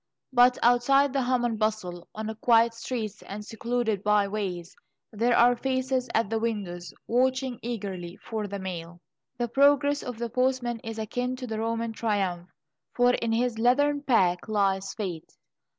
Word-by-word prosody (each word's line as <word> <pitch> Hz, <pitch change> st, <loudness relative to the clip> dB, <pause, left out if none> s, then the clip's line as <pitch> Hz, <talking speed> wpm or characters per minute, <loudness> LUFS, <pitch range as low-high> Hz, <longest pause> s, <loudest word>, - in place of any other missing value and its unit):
But 250 Hz, 0 st, +5 dB
outside 265 Hz, +3 st, +4 dB
the 275 Hz, -, +1 dB
hum 250 Hz, -1 st, +1 dB
and 225 Hz, -3 st, -1 dB
bustle, 210 Hz, -5 st, -2 dB
on 220 Hz, +1 st, -4 dB
quiet 230 Hz, -1 st, +4 dB
streets 230 Hz, -3 st, -5 dB
and 210 Hz, +1 st, -8 dB
secluded 225 Hz, -2 st, -2 dB
by 210 Hz, -1 st, +3 dB
ways, 190 Hz, -4 st, -4 dB, 0.4 s
there 235 Hz, +3 st, +2 dB
are 245 Hz, +1 st, +6 dB
faces 260 Hz, 0 st, -1 dB
at 225 Hz, -2 st, +2 dB
the 225 Hz, +2 st, -1 dB
windows, 200 Hz, -6 st, -3 dB
watching 260 Hz, 0 st, 0 dB
eagerly 195 Hz, -6 st, -5 dB
for 220 Hz, -2 st, -5 dB
the 200 Hz, 0 st, -5 dB
mail. 175 Hz, -3 st, -6 dB, 0.4 s
The 240 Hz, 0 st, -1 dB
progress 285 Hz, +3 st, +3 dB
of 245 Hz, -2 st, -6 dB
the 235 Hz, 0 st, -4 dB
postman 250 Hz, -1 st, 0 dB
is 225 Hz, 0 st, -7 dB
akin 245 Hz, +4 st, -2 dB
to 250 Hz, -3 st, -6 dB
a 220 Hz, -, -3 dB
Roman 230 Hz, 0 st, -2 dB
triumph, 195 Hz, -6 st, -1 dB, 0.5 s
for 245 Hz, 0 st, +4 dB
in 230 Hz, -2 st, -1 dB
his 230 Hz, 0 st, 0 dB
leathern 285 Hz, +5 st, +3 dB
pack 190 Hz, -10 st, +2 dB
lies 195 Hz, -2 st, +1 dB
Fate. 180 Hz, -7 st, -6 dB
230 Hz, 160 wpm, -27 LUFS, 205-245 Hz, 0.5 s, are